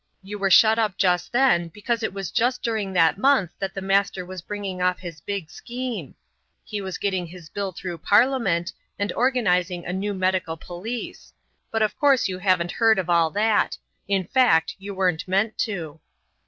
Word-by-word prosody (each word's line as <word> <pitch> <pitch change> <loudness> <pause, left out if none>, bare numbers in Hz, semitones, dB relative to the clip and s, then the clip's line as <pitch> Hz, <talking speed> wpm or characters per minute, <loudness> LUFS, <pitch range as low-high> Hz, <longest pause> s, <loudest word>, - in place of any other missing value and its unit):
"You 205 +2 -7
were 195 0 +1
shut 220 +4 +6
up 210 -4 0
just 180 -2 +1
then 240 -10 +3
because 220 +7 -3
it 220 - -1
was 195 -3 -5
just 245 +2 0
during 220 -4 -1
that 170 +1 +3
month 260 - +3
that 195 0 -4
the 195 - -4
Master 195 -1 +1
was 185 -1 -7
bringing 195 -1 -5
off 180 0 +2
his 170 -4 -9
big 195 -4 -5
scheme. 245 -1 -6 0.5
He 210 -2 -4
was 190 -1 -5
getting 190 -3 -1
his 170 -2 -12
bill 200 -2 -3
through 175 -1 -6
Parliament, 205 - +2 0.2
and 200 0 -2
organizing 180 -9 +1
the 175 - -4
new 200 +2 -2
medical 185 -3 0
police. 190 +9 -7 0.4
But 225 -1 +1
of 210 -2 0
course 280 -6 +4
you 185 -1 -5
haven't 180 -2 +1
heard 225 -2 +3
of 180 -2 -1
all 170 -1 +4
that; 210 +4 +1 0.3
in 195 -1 +1
fact, 225 -7 +3
you 200 +1 -7
weren't 180 -3 0
meant 200 +4 0
to." 165 -8 -3
195 Hz, 180 wpm, -24 LUFS, 180-220 Hz, 0.5 s, shut